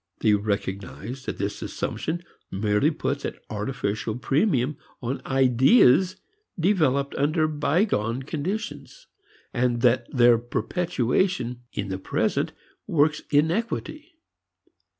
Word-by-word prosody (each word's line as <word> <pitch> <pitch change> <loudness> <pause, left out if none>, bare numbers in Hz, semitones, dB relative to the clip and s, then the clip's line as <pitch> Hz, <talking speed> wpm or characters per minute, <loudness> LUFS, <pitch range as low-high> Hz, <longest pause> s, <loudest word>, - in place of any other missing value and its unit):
They 110 - +4
recognize 100 +4 -3
that - - -3
this 100 +1 -3
assumption 170 +2 -3 0.3
merely 105 +7 +2
puts 140 -2 -2
an - - -3 0.2
artificial 110 0 -2
premium 140 - +1 0.2
on 125 +2 -3
ideas 135 - +5 0.4
developed 150 -7 +2
under 155 +3 +2
bygone 140 - 0
conditions, 200 - -5 0.5
and 120 -1 +1
that 120 -1 +3
their 120 -3 +5
perpetuation 125 -1 -1
in 100 -1 -4
the 95 0 -3
present - - 0 0.4
works 155 0 +2
inequity. 230 - -1
135 Hz, 100 wpm, -25 LUFS, 115-160 Hz, 0.5 s, ideas